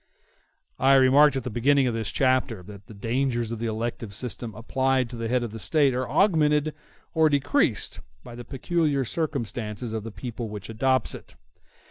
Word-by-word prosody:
I 135 +1 +5
remarked 135 +3 +6
at 135 - -2
the 125 - -4
beginning 135 +4 +3
of 125 - 0
this 115 -1 -3
chapter 130 -7 +1
that 100 +1 -12
the - - -11
dangers 120 +2 -1
of 115 - -4
the 115 - -2
elective 110 -2 -4
system 115 0 -4
applied 130 +2 0
to - - -7
the 115 -1 -3
head 125 +1 +1
of 115 - -4
the 110 - -7
State 140 +2 +2
are 125 -1 -2
augmented 150 -3 +3 0.4
or 160 -1 +4
decreased 145 - +1 0.2
by 120 - -10
the 120 +1 -8
peculiar 140 +2 0
circumstances 115 - -3
of 110 -2 -3
the 115 - -6
people 115 0 -6
which 105 -1 -8
adopts 130 +4 +1
it. - - -11
125 Hz, 180 wpm, -25 LUFS, 115-135 Hz, 0.4 s, remarked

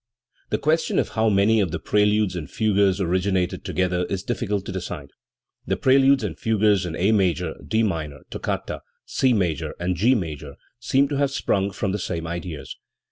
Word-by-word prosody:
The - - +1
question 160 +2 +1
of - - +1
how 110 0 +1
many 105 +2 +4
of 95 -4 +1
the - - -3
preludes 105 -1 +2
and 80 -4 -5
fugues 100 -3 +2
originated 95 0 0
together 90 -1 0
is 95 0 -3
difficult 105 -5 -2
to - - -5
decide, 85 -6 -6 0.6
The - - 0
preludes 135 0 +4
and 85 -6 -4
fugues 105 -4 +2
in 80 - -4
A 95 +6 +2
major, 90 -5 +1
D 110 0 +1
minor 80 -8 -3
(toccata), - - -3 0.2
C 130 - +1
major 90 - 0
and 90 +1 -1
G 120 +9 +3
major 75 - -5 0.2
seem 135 +3 +2
to 145 - -1
have 140 -1 +2
sprung 100 -7 0
from 100 0 -2
the 105 - -2
same 85 -3 -3
ideas. 80 -5 -6
95 Hz, 180 wpm, -23 LUFS, 90-110 Hz, 0.6 s, many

